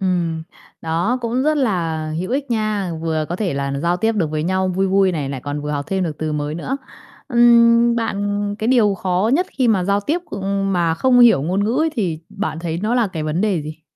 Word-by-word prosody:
Ừm, 175 -4 -1 0.4
đó 170 +10 0
cũng 240 +2 -1
rất 305 +2 +2
là 165 - -1
hữu 185 +5 -4
ích 275 0 -2
nha, 215 -5 -1
vừa 160 -1 -1
có 175 - -3
thể 185 -6 -2
là 140 0 -2
giao 175 +1 +1
tiếp 225 +3 +1
được 170 -8 -1
với 155 -1 -2
nhau 185 +2 0
vui 190 +1 0
vui 190 -1 +3
này, 145 -4 -3
lại 135 -2 -5
còn 145 +2 -4
vừa 150 - -4
học 145 -1 -2
thêm 190 -1 0
được 155 -3 -5
từ 155 -1 -2
mới 150 0 -2
nữa. 255 +11 -3 0.5
Ừm, 235 -1 +5
bạn 205 -2 -2
cái 220 - -2
điều 225 -6 +4
khó 185 +3 0
nhất 355 +6 +2
khi 255 -3 0
mà 195 -5 +2
giao 200 +2 +1
tiếp, 300 - -1
ưm, 195 0 -2
mà 170 -3 +1
không 250 +6 +3
hiểu 235 - +6
ngôn 185 +6 0
ngữ 230 +5 0
ấy 320 - +1
thì 180 -9 -1
bạn 200 -5 -4
thấy 165 -1 -3
nó 225 +3 0
là 240 -3 +2
cái 170 -5 -5
vấn 155 +3 -1
đề 195 -6 0
gì? 155 +2 -9
190 Hz, 235 wpm, -19 LUFS, 165-225 Hz, 0.5 s, hiểu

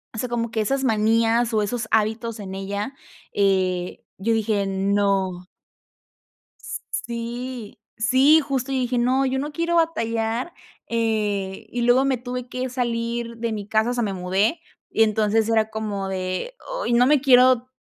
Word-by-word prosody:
o - - -6
sea, 250 +2 -2
como 235 -1 -1
que 220 -1 -1
esas 270 +5 0
manías 225 +1 +2
o 215 - +3
esos 225 +2 -2
hábitos 220 +1 0
en 190 -1 -6
ella, 200 +7 -4 0.4
eh, 185 -3 0
yo 225 +4 0
dije 215 -2 +1
no. 195 -2 0 1.2
Sí, 235 -1 -5 0.2
sí, 260 +7 +5
justo 275 -2 -2
y 265 - +1
dije: 245 0 0
"No, 260 +3 +2
yo 265 0 0
no 295 +2 -3
quiero 335 +2 0
batallar", 230 -4 0 0.4
eh, 210 -4 -1
y 245 - -2
luego 245 +3 +4
me 270 -1 +2
tuve 250 0 -5
que 255 +1 -3
salir 235 -1 -2
de 230 -1 -2
mi 205 -2 -5
casa. 220 +2 +2
O - - -1
sea, 240 - 0
me 200 -3 -1
mudé 190 - 0 0.3
y 225 - +3
entonces 215 +1 +1
era 220 -1 +2
como 205 -3 -3
de, 185 - -3 0.3
ay, - - 0
no 245 +1 +5
me 295 -1 +4
quiero 255 -2 +5
230 Hz, 160 wpm, -23 LUFS, 205-250 Hz, 1.2 s, sí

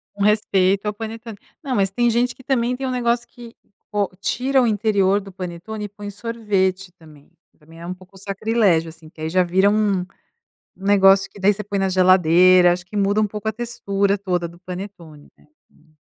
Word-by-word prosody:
Com 200 - -2
respeito 200 -2 +2
ao 210 - -1
panetone. 225 0 -8 0.2
Não 270 -4 -3
mas, 195 -2 +1
tem 240 +4 +1
gente 240 +2 +1
que - - -17
também 250 -2 0
tem 265 0 -3
um - - -2
negócio 240 -1 0
que 235 -1 -13 0.4
ou 205 -2 0
tira 265 +5 +1
o 245 - +2
interior 205 -2 +2
do 200 -1 -11
panetone 185 +4 -7
e - - -8
põe 205 +1 -10
o 205 - -5
sorvete 195 -4 -2
também. 155 -4 -18 0.3
Também 165 +2 -17
é - - -8
um 180 - -3
pouco 185 +1 -17
sacrilégio 195 -4 0
assim, 160 -1 -15
que 155 - -15
aí 160 - -2
já 185 +2 +3
vira 190 +3 +3
um 205 -3 +1 0.7
um 190 - -11
negócio 195 -1 +5
que 200 - -14
daí 200 +2 +4
você 210 +1 -7
põe 200 0 -3
na 195 0 +1
geladeira, 185 -1 +5
acho 175 0 -2
que 205 +3 -6
muda 200 +1 +1
um 215 - +2
pouco 210 +1 -5
a - - 0
textura 200 -3 -1
toda 180 -3 -2
do 170 +1 -14
panetone 180 -5 -9
né, - - -24 0.3
hum. 155 0 -28
200 Hz, 210 wpm, -21 LUFS, 185-220 Hz, 0.7 s, negócio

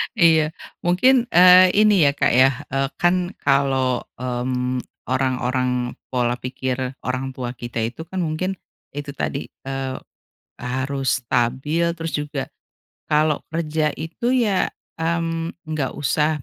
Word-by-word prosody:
Iya 160 -5 +4 0.3
mungkin, 240 +8 +4
eee, 180 +1 +8
ini 205 -5 +5
ya, - - +4
Kak, - - +2
ya, 130 +2 +6 0.2
eee, 135 0 +1
kan 180 +1 +1
kalau, 135 -3 +2
mmm, 125 0 -2 0.3
orang-orang 125 -1 0 0.2
pola 120 -1 +1
pikir 130 +1 -3 0.2
orang 130 +1 -3
tua 125 -1 -5
kita 120 -1 -5
itu 120 +8 -4
kan 190 +2 -4
mungkin, 170 +4 -2 0.4
itu 145 0 -5
tadi, 140 0 -3 0.2
eee, 135 -1 -3 0.6
harus 130 +2 -1
stabil 130 +8 0
terus 165 -2 -5
juga, 145 -2 -3 0.6
kalau 150 0 +2
kerja 155 -1 -1
itu 170 +11 -2
ya, 215 -7 +2 0.3
mmm, 165 0 -1 0.2
nggak 150 -4 -1
usah 150 0 0
140 Hz, 125 wpm, -22 LUFS, 130-165 Hz, 0.6 s, eee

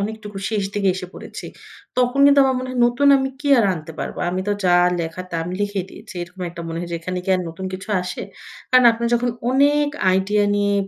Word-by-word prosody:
অনেকটুকু 210 -1 -5
শেষ 215 -2 0
দিকে 200 -2 +2
এসে 185 -1 -6
পড়েছি। - - -9 0.5
তখন 250 +2 +1
কিন্তু 285 0 +6
আমার 265 -1 +1
মনে 255 0 -5
হয় 255 -1 -2
নতুন 250 +4 +2
আমি 265 0 0
কি 290 - -2
আর 230 - +4
আনতে 160 -1 -8
পারবো? - - -5
আমি 185 +1 -2
তো - - +2
যা 175 -1 +5 0.2
লেখা 165 +2 -5
তা - - -7
আমি 180 +2 -5
লিখেই 205 -2 -1
দিয়েছি। - - -12
এরকম 175 +2 -11
একটা 170 - -9
মনে 165 0 -4
হয় 175 - -5
যে - - -1
এখানে 185 +2 -4
কি - - -9
আর - - -2
নতুন 165 +3 -8
কিছু 190 +1 -7
আসে? 180 - -5 0.5
কারণ 255 -1 +6
আপনার 235 +1 -2
যখন 240 +1 +1 0.2
অনেক 290 +2 +3 0.2
আইডিয়া 200 +2 +2
নিয়ে 205 0 +1
205 Hz, 225 wpm, -21 LUFS, 185-250 Hz, 0.5 s, কিন্তু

